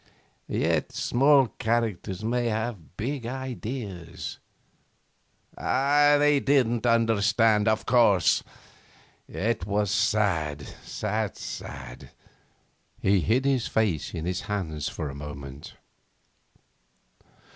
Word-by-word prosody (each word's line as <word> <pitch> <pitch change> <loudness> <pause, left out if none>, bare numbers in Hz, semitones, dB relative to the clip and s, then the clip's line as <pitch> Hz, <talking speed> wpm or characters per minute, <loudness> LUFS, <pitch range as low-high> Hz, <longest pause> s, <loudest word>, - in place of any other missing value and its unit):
Yet - - 0
small 135 0 +4
characters 110 -5 -1
may 120 +2 0
have 110 -6 -4
big 125 +2 -3
ideas.... 120 -8 -6 1.2
They 145 +1 +3
didn't 125 -4 +2
understand, 115 -1 +3
of 110 0 +1
course.... 115 -7 +4 0.9
It 105 -3 -2
was 105 -1 0
sad, 100 -9 +1 0.2
sad, 105 0 -3
sad.' 65 -3 -8 0.9
He 100 0 +3
hid 120 +9 +1
his 135 -4 +1
face 100 -9 0
in 80 - -4
his 90 +1 -2
hands 95 -8 -4
a 70 -3 -3
moment. 70 -1 -9
110 Hz, 90 wpm, -26 LUFS, 95-120 Hz, 1.2 s, small